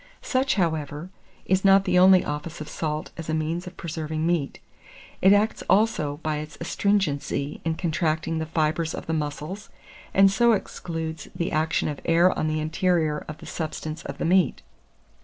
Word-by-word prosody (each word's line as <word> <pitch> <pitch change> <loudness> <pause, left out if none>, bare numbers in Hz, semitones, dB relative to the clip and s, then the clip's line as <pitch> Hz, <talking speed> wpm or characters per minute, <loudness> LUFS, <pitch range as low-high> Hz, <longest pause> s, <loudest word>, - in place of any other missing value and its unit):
Such, 260 +1 +1
however, 160 -2 -2 0.3
is 190 0 +1
not 195 0 +6
the 180 - +3
only 185 0 +6
office 150 +3 -5
of 155 - -6
salt 155 -1 -3
as 165 -1 -6
a 160 - +1
means 165 +3 -2
of 180 - -10
preserving 160 -1 -3
meat; 170 -5 -1 0.6
it 190 - +6
acts 205 +2 +3
also 190 -9 +2
by 155 -1 -1
its 155 0 -7
astringency 165 -6 -1
in 165 -1 -1
contracting 160 -1 -1
the 160 - -3
fibres 160 +1 0
of - - -7
the 160 - -2
muscles, 150 +6 -4 0.4
and 195 0 +5
so 235 +3 +4
excludes 160 -6 -4
the 170 -1 -2
action 155 +1 +1
of 145 -2 -4
air 170 +2 +4
on 155 - -1
the 155 0 0
interior 160 -1 0
of 155 - -7
the - - -12
substance 155 0 -5
of - - -6
the - - -2
meat. 180 +2 +2
160 Hz, 175 wpm, -25 LUFS, 155-185 Hz, 0.6 s, not